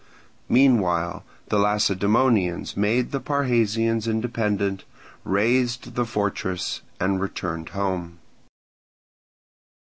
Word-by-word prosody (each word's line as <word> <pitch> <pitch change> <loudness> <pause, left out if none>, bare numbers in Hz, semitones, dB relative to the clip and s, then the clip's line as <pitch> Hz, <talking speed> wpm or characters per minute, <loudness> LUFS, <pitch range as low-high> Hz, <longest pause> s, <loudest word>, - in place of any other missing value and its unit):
Meanwhile 95 -10 +3 0.3
the 105 - +2
Lacedaemonians 100 -1 +2
made 110 +5 +1
the 140 - -1
Parrhasians 115 -5 +1
independent, 105 -4 -1 0.4
razed 120 +4 +1
the 120 - 0
fortress, 100 -4 -2 0.2
and 95 +1 0
returned 85 -4 -4
home. 90 -3 -3
105 Hz, 80 wpm, -24 LUFS, 95-120 Hz, 0.4 s, Meanwhile